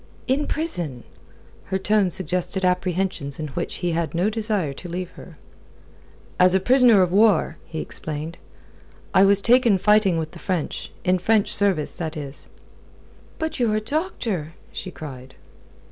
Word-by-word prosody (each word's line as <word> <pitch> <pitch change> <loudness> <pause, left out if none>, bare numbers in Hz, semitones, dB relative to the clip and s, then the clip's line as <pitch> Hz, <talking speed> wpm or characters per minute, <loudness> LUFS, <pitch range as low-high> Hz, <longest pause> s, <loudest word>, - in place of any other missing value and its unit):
"In 275 +3 0
prison?" 175 - -3 0.6
Her 190 - -1
tone 200 0 +2
suggested 185 +2 -1
apprehensions 180 -5 -1
in 155 -1 -4
which 170 +5 -4
he 175 - +1
had 165 0 -2
no 185 +6 +1
desire 210 -9 -1
to 175 +6 -9
leave 180 +1 -4
her. 165 -4 -13 1.0
"As 180 +1 +6
a - - +4
prisoner 245 -2 +5
of 180 - -1
war," 205 -3 +3
he 160 -1 -5
explained. 155 +2 -5 0.7
"I 190 - +6
was 200 0 +4
taken 240 -4 +5
fighting 210 -2 +3
with 160 -1 -3
the 170 - -11
French 180 -4 -3
in 185 0 +2
French 210 +2 +2
service, 195 -7 +1
that 160 -1 -5
is." 140 -1 -8 0.9
"But 320 -3 -3
you're 225 -3 +2
a - - +2
doctor!" 220 - -3 0.2
she 190 - -6
cried. 130 -6 -10
185 Hz, 150 wpm, -23 LUFS, 165-215 Hz, 1.0 s, As